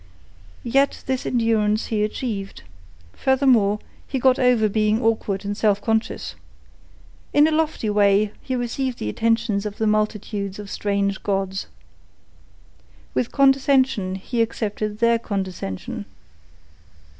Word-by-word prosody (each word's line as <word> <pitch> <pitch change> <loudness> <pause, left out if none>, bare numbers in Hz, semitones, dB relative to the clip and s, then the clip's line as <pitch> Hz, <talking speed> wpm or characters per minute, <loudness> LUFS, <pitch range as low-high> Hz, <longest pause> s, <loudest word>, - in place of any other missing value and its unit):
Yet 275 +3 +1
this 260 -1 -2
endurance 220 -3 +1
he 210 -1 +2
achieved. 210 -2 -4 0.5
Furthermore, 250 - +3 0.3
he 270 - -2
got 255 0 +3
over 245 -4 +4
being 215 +1 +1
awkward 220 -4 0
and 205 0 -2
self 205 -1 +2
conscious. 220 +1 -1 1.0
In 290 +1 +6
a - - 0
lofty 310 -7 0
way 205 0 +3
he 260 - -3
received 245 +1 -2
the 105 - -3
attentions 225 - 0
of 210 -1 -5
the 220 - 0
multitudes 210 -2 -1
of 205 -1 -8
strange 200 -1 -1
gods. 195 -1 -2 1.5
With 240 - -1
condescension 265 -7 +3
he 230 +5 -2
accepted 215 -2 -2
their 235 +1 +3
condescension. 190 - -4
215 Hz, 120 wpm, -22 LUFS, 200-250 Hz, 1.5 s, In